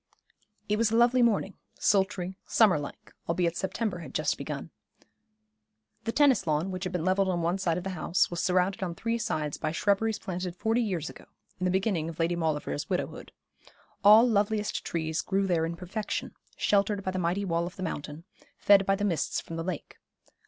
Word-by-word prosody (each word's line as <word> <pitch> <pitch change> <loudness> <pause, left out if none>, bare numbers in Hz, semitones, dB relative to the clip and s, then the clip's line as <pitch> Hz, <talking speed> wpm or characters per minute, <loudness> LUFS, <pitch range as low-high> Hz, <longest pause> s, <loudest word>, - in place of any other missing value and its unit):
It 210 0 0
was 230 -1 +3
a 225 - 0
lovely 240 +2 +4
morning, 210 -4 +2 0.2
sultry, 190 -2 +1
summer 205 -9 +4
like, 145 - -9 0.2
albeit 170 0 +1
September 190 0 -2
had 170 - -10
just - - +1
begun. - - -6 1.3
The 230 - 0
tennis 275 - +3
lawn, 155 +5 0
which 185 0 -4
had 185 - -3
been 175 -2 -1
levelled 190 +1 +2
on 175 -2 0
one 175 +3 0
side 170 -3 0
of 180 - -4
the 190 - -3
house, 180 +3 +1
was 170 -1 -2
surrounded 185 +2 +1
on 175 -3 -3
three 230 +5 -2
sides 150 -8 -2
by 155 - -1
shrubberies 205 +5 +1
planted 180 -2 -5
forty 225 +5 +1
years 180 -9 -2
ago, - - -11 0.3
in 185 - -1
the - - +2
beginning 185 -4 0
of 165 - -8
Lady 170 +1 +1
Maulevrier's 150 - -2
widowhood. - - -3 0.7
All 215 +4 +8
loveliest 210 -1 0
trees 160 -1 -2
grew 195 +1 0
there 165 -3 +1
in 170 - -4
perfection, 190 +5 -4 0.2
sheltered 200 0 +1
by 185 - -1
the 185 - -3
mighty 180 +3 0
wall 170 -1 0
of 180 - -9
the 185 - -6
mountain, 150 -2 -5 0.3
fed 200 -1 +5
by 195 - +4
the 205 +1 -1
mists 170 -7 0
from 165 - -8
the 165 - -3
lake. 180 -3 -6
185 Hz, 195 wpm, -28 LUFS, 170-205 Hz, 1.3 s, All